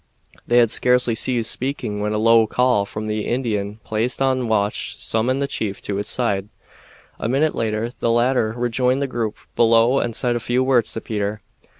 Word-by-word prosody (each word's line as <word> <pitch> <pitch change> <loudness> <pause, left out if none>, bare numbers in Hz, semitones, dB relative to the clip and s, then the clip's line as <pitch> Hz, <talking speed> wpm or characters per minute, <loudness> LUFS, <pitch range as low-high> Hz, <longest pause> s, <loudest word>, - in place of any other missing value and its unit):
They 120 - +3
had 115 -2 +4
scarcely 125 -1 +3
ceased 115 0 +3
speaking 125 -5 -3
when 105 0 -1
a 105 - -1
low 115 0 +4
call 125 -4 +1
from 105 +1 -6
the 105 0 -3
Indian 110 -4 -2
placed 110 +3 -1
on 130 -2 +1
watch 105 -2 -1
summoned 130 +5 -1
the - - -1
chief 105 -7 -3
to 100 - -3
his 100 - -3
side. 100 -5 -1 0.7
A 115 - -2
minute 145 +5 +1
later 110 +1 -2
the 115 - 0
latter 120 -1 +2
rejoined 125 +3 0
the - - +1
group 115 -5 -3 0.2
below 115 +3 +4
and 115 -2 -2
said 120 -1 0
a - - -1
few 120 +2 0
words 130 -4 +2
to 115 - -5
Peter. 105 -1 -4
115 Hz, 190 wpm, -21 LUFS, 110-125 Hz, 0.7 s, had